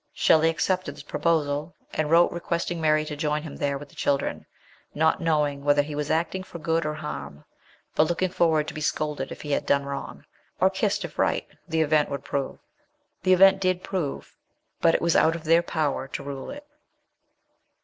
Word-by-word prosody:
Shelley 160 0 +4
accepted 185 +3 -1
this - - -11
proposal, 155 -1 0 0.2
and 155 -1 -1
wrote 170 +2 +5
requesting 170 0 -2
Mary 155 -1 +3
to 150 - -5
join 150 0 -1
him 155 - -8
there 140 -1 -1
with 145 +1 -11
the - - -20
children, 140 -1 -1 0.5
not 160 +3 +2
knowing 150 -4 +1
whether 145 0 +4
lie 150 +1 -7
was 150 0 -3
acting 170 +3 0
for 185 - -9
good 165 0 0
or 150 - -2
harm, 75 - -7 0.5
but 155 - +3
looking 175 +1 0
forward 160 -4 +2
to - - -5
be 155 - -6
scolded 150 -3 -2
if - - -8
he 150 - -5
had - - 0
done 140 0 +2
wrong, 140 0 -6 0.3
or - - +4
kissed - - 0
if - - -10
right - - +1 0.2
the 160 0 +1
event 155 -1 +2
would 140 -1 -4
prove. 140 -1 -3 0.6
The 185 +1 +4
event 195 +1 +6
did 185 -1 +1
prove; 180 -8 -4 0.5
but 165 - +4
it - - 0
was 170 -1 +2
out 165 - +4
of 165 - -7
their 165 +1 +4
power 155 -5 -1
to 140 - -6
rule 140 -1 -6
it. 290 +1 -8
155 Hz, 195 wpm, -25 LUFS, 145-170 Hz, 0.6 s, event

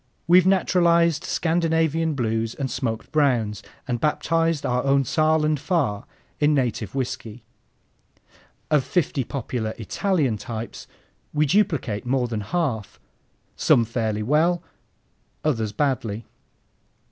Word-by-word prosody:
We've 180 +1 +6
naturalized 170 -4 +3
Scandinavian 165 -2 +1
Blues 115 -2 -1
and 135 -2 -3
smoked 115 -4 -3
browns 125 -9 +1 0.3
and 120 -3 -2
baptized 165 0 +1
our 125 0 0
own 140 0 +3
Saaland 155 0 +2
Pfarr 140 - -1 0.3
in 150 0 +3
native 120 -5 -1
whiskey. 120 -3 -4 1.3
Of 150 -3 +4
fifty 145 -5 0
popular 115 -4 -4
Italian 140 - 0
types 115 +2 -7 0.5
we 150 +1 +3
duplicate 150 - +1
more 125 0 0
than 110 -3 -3
half, 115 - -2 0.6
some 115 - +4
fairly 110 -2 -2
well, 165 +7 +2 0.8
others 115 -8 0
badly. 115 -4 -1
135 Hz, 110 wpm, -23 LUFS, 115-160 Hz, 1.3 s, We've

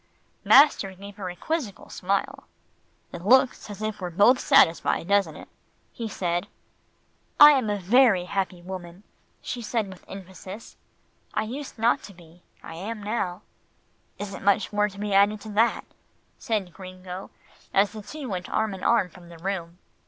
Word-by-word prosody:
Master 275 -8 +6
gave 200 +1 -11
her 190 -3 -5
a 180 - -7
quizzical 270 - -4
smile. 195 +2 -2 0.7
"It 170 - -7
looks 255 +2 +3
as 205 +1 -7
if 215 -1 -3
we - - -3
were - - -3
both 205 +9 +4
satisfied, 165 0 +3
doesn't 200 0 +2
it?" - - -11 0.5
he 230 - -5
said. 175 -3 -2 0.9
"I 295 0 +11
am 260 -7 +1
a 205 - 0
very 200 -1 +4
happy 185 -2 -3
woman," 180 0 -8 0.4
she 245 - -4
said 225 -2 -2
with 185 -2 -12
emphasis. 190 +2 -10 0.6
"I - - +1
used 265 +6 -7
not 235 +4 +2
to 200 - -12
be. 170 0 -18 0.2
I - - -9
am 205 +6 -6
now." 205 -3 -3 0.7
"Isn't 200 -1 -7
much 200 +2 +2
more 210 0 +2
to 195 - -14
be 205 -1 -2
added 200 +2 +4
to 220 - -9
that," 220 +3 +1 0.5
said 205 -6 -2
Gringo, 185 0 -9 0.4
as 200 +1 +3
the 215 -1 -8
two 290 +6 -8
went 185 -4 -4
arm 220 -2 0
in 190 - -9
arm 235 -6 +3
from 175 -1 -16
the 170 - -12
room. 175 -1 -4
200 Hz, 165 wpm, -25 LUFS, 185-220 Hz, 0.9 s, I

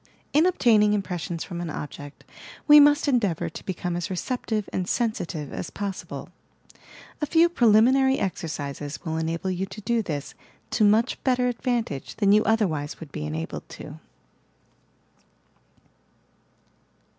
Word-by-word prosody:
In 315 +4 +5
obtaining 220 - +4
impressions 175 -4 -3
from 175 -2 -6
an 170 - -4
object, 145 -1 -8 0.4
we 295 0 +10
must 290 +1 +5
en 255 -4 +4
deavour 190 -8 -2
to - - -8
become 180 -1 -3
as 175 +3 -3
receptive 215 +1 -2
and 185 -1 -2
sensitive 180 - -2
as - - -5
possible, 200 -2 -6 0.9
A 300 - 0
few 330 +2 +5
preliminary 265 -1 +4
exercises 145 -5 -4
will 160 -1 -2
enable 165 +3 -2
you 185 +1 -2
to 190 +3 -9
do 235 +2 +1
this 150 -8 -5 0.4
to 220 - +2
much 220 +4 +3
better 250 -1 +2
advantage 235 - -2
than 200 -2 +3
you 210 +1 +5
otherwise 180 -10 0
would 160 -4 -10
be 75 - -4
enabled 80 +2 -5
to. - - -10
200 Hz, 135 wpm, -25 LUFS, 165-240 Hz, 0.9 s, we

